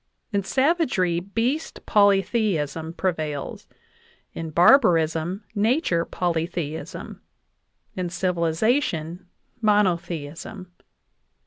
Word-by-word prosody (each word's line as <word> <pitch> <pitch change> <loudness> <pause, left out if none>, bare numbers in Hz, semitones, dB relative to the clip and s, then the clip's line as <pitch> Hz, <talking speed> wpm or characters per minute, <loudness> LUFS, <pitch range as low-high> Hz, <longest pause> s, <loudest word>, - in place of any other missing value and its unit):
In 200 -1 +1
savagery, 260 - +1
beast 230 - -2
poly 200 -2 +4
theism 165 - -1
prevails; 155 -5 -3 0.7
in 165 -1 -5
barbarism, 170 - +4
nature 215 - +1
polytheism; 165 -2 -3 0.7
in 185 -1 -2
civiliza 175 - +1
tion, 170 - -5 0.3
monotheism. 180 -3 -1
180 Hz, 75 wpm, -24 LUFS, 165-210 Hz, 0.7 s, poly